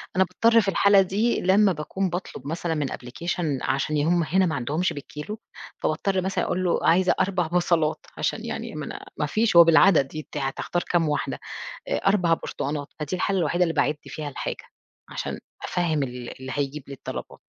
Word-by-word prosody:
أنا 190 Hz, -, +5 dB
باضطر 230 Hz, +4 st, +4 dB
في 200 Hz, -, -4 dB
الحالة 200 Hz, +1 st, +5 dB
دي 205 Hz, +6 st, +1 dB
لمّا 195 Hz, +2 st, +4 dB
باكون 180 Hz, +5 st, -2 dB
باطلب 175 Hz, -4 st, -6 dB
مثلًا 165 Hz, +1 st, -2 dB
من 145 Hz, -3 st, -1 dB
أبلكيشن 150 Hz, +3 st, -3 dB
عشان 140 Hz, +3 st, 0 dB
ي 145 Hz, -, +2 dB
هُم 170 Hz, 0 st, +3 dB
هنا 185 Hz, +4 st, +2 dB
ما 160 Hz, -, -1 dB
عندهمش 145 Hz, +8 st, -1 dB
بالكيلو، 150 Hz, +9 st, -7 dB, 0.4 s
فباضطر 185 Hz, +4 st, 0 dB
مثلًا 190 Hz, +1 st, -1 dB
أقول 185 Hz, -, -1 dB
له 175 Hz, -, +2 dB
عايزة 185 Hz, +2 st, +4 dB
4 185 Hz, -3 st, +1 dB
بصلات 170 Hz, -2 st, +1 dB
عشان -, -, -1 dB
يعني -, -, -5 dB
منا -, -, -6 dB
مافيش 220 Hz, -2 st, +1 dB
هو 170 Hz, -, +11 dB
بالعدد 165 Hz, -3 st, +5 dB
ي 155 Hz, -, -5 dB
ت -, -, -5 dB
هتختار 140 Hz, +5 st, -2 dB
كام 165 Hz, -3 st, +1 dB
واحدة؟ 150 Hz, -, -2 dB, 0.5 s
آآ، -, -, 0 dB
4 180 Hz, -4 st, +4 dB
برتقانات، 145 Hz, -2 st, -3 dB
فدي 150 Hz, +4 st, -2 dB
الحالة 195 Hz, +1 st, 0 dB
الوحيدة 175 Hz, +2 st, +2 dB
اللي 165 Hz, -2 st, 0 dB
باعِد 150 Hz, +1 st, +1 dB
فيها 150 Hz, -2 st, -6 dB
الحاجة، -, -, -5 dB, 0.5 s
عشان -, -, -4 dB, 0.2 s
أفَهّم 160 Hz, -5 st, 0 dB
ال 125 Hz, -2 st, -7 dB
اللي 130 Hz, 0 st, -6 dB
هيجيب 145 Hz, 0 st, -2 dB
لي 140 Hz, -, -7 dB
الطلبات. 135 Hz, -, -7 dB
170 Hz, 180 wpm, -25 LUFS, 150-185 Hz, 0.5 s, هو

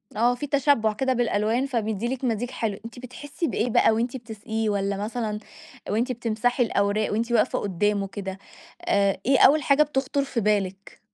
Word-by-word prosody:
آه، 240 Hz, +3 st, +3 dB
في 290 Hz, +4 st, -5 dB
تشبُّع 275 Hz, -6 st, +2 dB
كده 260 Hz, +4 st, 0 dB
بالألوان، 230 Hz, +1 st, +1 dB
فبيدي 225 Hz, -4 st, -2 dB
لِك 265 Hz, -, -16 dB
مزيج 240 Hz, 0 st, -1 dB
حلو. 220 Hz, -5 st, -2 dB
أنتِ 235 Hz, +1 st, -9 dB
بتحسّي 285 Hz, +6 st, -5 dB
بإيه 245 Hz, -, -1 dB
بقى 225 Hz, -, +4 dB
وأنتِ 235 Hz, +3 st, -1 dB
بتسقِيه 220 Hz, -1 st, -4 dB
والّا 200 Hz, -1 st, -1 dB
مثلًا 215 Hz, 0 st, -3 dB, 0.5 s
وأنتِ 235 Hz, +5 st, 0 dB
بتمسحي 245 Hz, +1 st, 0 dB
الأوراق 210 Hz, -1 st, 0 dB
وأنتِ 230 Hz, +3 st, -1 dB
واقفة 230 Hz, -3 st, +2 dB
قُدّامه 200 Hz, +1 st, 0 dB
كده، 195 Hz, -1 st, -6 dB, 0.4 s
آآ 200 Hz, -1 st, +2 dB
إيه 270 Hz, 0 st, +4 dB
أول 295 Hz, +2 st, +6 dB
حاجة 280 Hz, +1 st, +5 dB
بتخطُر 280 Hz, -1 st, -1 dB
في 270 Hz, -3 st, -3 dB
بالِك؟ 200 Hz, -2 st, -1 dB
225 Hz, 165 wpm, -25 LUFS, 210-255 Hz, 0.5 s, أول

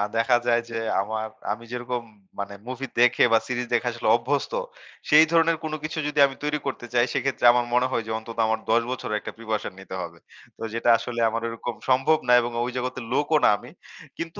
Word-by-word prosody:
দেখা 115 Hz, +2 st, +3 dB
যায় 120 Hz, 0 st, +3 dB
যে 115 Hz, -, -6 dB, 0.3 s
আমার 110 Hz, +2 st, -3 dB, 0.3 s
আমি 110 Hz, +2 st, -4 dB
যেরকম 125 Hz, 0 st, -3 dB, 0.4 s
মানে 100 Hz, 0 st, -4 dB
মুভি 130 Hz, +1 st, -4 dB
দেখে 125 Hz, 0 st, +5 dB
বা -, -, +7 dB
সিরিজ 125 Hz, -1 st, -2 dB
দেখে 120 Hz, +1 st, +1 dB
আসলে 120 Hz, -1 st, -4 dB
অভ্যস্ত, 135 Hz, -, -1 dB, 0.6 s
সেই 155 Hz, +2 st, +8 dB
ধরনের 165 Hz, 0 st, +3 dB
কোন 155 Hz, -1 st, -4 dB
কিছু 155 Hz, +2 st, -4 dB
যদি 150 Hz, 0 st, -2 dB
আমি 135 Hz, -, -9 dB
তৈরি 150 Hz, 0 st, 0 dB
করতে 125 Hz, -2 st, -4 dB
চাই, 120 Hz, 0 st, +4 dB
সেক্ষেত্রে 135 Hz, -2 st, -1 dB
আমার 120 Hz, 0 st, +1 dB
মনে 125 Hz, +1 st, +3 dB
হয় 115 Hz, -, 0 dB
যে -, -, -4 dB
অন্তত 115 Hz, +1 st, -9 dB
আমার 110 Hz, 0 st, 0 dB
১০ 115 Hz, +1 st, +4 dB
বছরের 110 Hz, -4 st, -2 dB
একটা -, -, -7 dB
প্রিপারেশন 110 Hz, -3 st, -3 dB
নিতে 95 Hz, -1 st, -8 dB
হবে। 85 Hz, -1 st, -7 dB, 0.4 s
তো -, -, -18 dB
যেটা 115 Hz, +1 st, 0 dB
আসলে 120 Hz, 0 st, -5 dB
আমার 115 Hz, +1 st, -3 dB
ঐরকম 115 Hz, +1 st, -5 dB
সম্ভব 135 Hz, +5 st, +4 dB
না -, -, +4 dB
এবং 120 Hz, 0 st, -3 dB
অ -, -, +1 dB
ঐ -, -, -3 dB
জগতের 125 Hz, -1 st, -4 dB
লোকও 150 Hz, +2 st, +2 dB
না -, -, +7 dB
আমি। 120 Hz, +4 st, -13 dB, 0.5 s
কিন্তু 165 Hz, +4 st, -6 dB
120 Hz, 215 wpm, -25 LUFS, 115-135 Hz, 0.6 s, সেই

